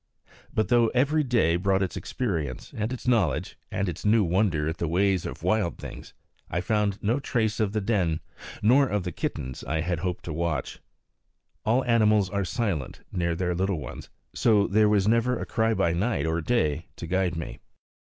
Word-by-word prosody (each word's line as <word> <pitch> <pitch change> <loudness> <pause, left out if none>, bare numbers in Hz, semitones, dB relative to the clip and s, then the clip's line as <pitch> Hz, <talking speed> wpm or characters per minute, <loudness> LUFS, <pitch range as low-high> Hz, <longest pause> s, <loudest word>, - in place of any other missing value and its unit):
But 110 - 0
though 120 -2 +5
every 145 +5 +3
day 115 - +2
brought 95 +1 +2
its 90 - -3
experience, 80 - -3
and 110 +2 -2
its 130 0 -6
knowledge, 105 - +1
and 95 - -1
its 85 - -5
new 105 +1 +4
wonder 85 -4 +1
at 80 +2 -2
the 85 - -1
ways 95 +2 +1
of - - -8
wild 105 -7 +1
things, - - -9 0.3
I 85 - -1
found 100 +1 0
no 115 +7 +2
trace 110 -5 -1
of 105 -3 +1
the 110 0 -1
den, 95 -7 +1 0.4
nor 130 +6 +5
of 105 -5 -1
the 90 - -3
kittens 65 -4 -4
I 80 +5 -1
had 85 0 -1
hoped 90 0 -3
to 85 - -4
watch. 80 -4 -2 0.9
All 120 +4 +3
animals 110 -5 +3
are 100 -1 0
silent 90 - -2
near 85 -2 0
their 90 +1 -1
little 95 +1 0
ones, 65 -2 -8 0.2
so 105 -3 +3
there 105 +1 +3
was 105 -2 +3
never 115 +2 +2
a - - -4
cry 110 0 +1
by 85 - +2
night 90 -3 0
or 80 +1 0
day 80 -7 0
to - - -7
guide 90 0 0
me. 80 - -6
95 Hz, 190 wpm, -26 LUFS, 85-110 Hz, 0.9 s, though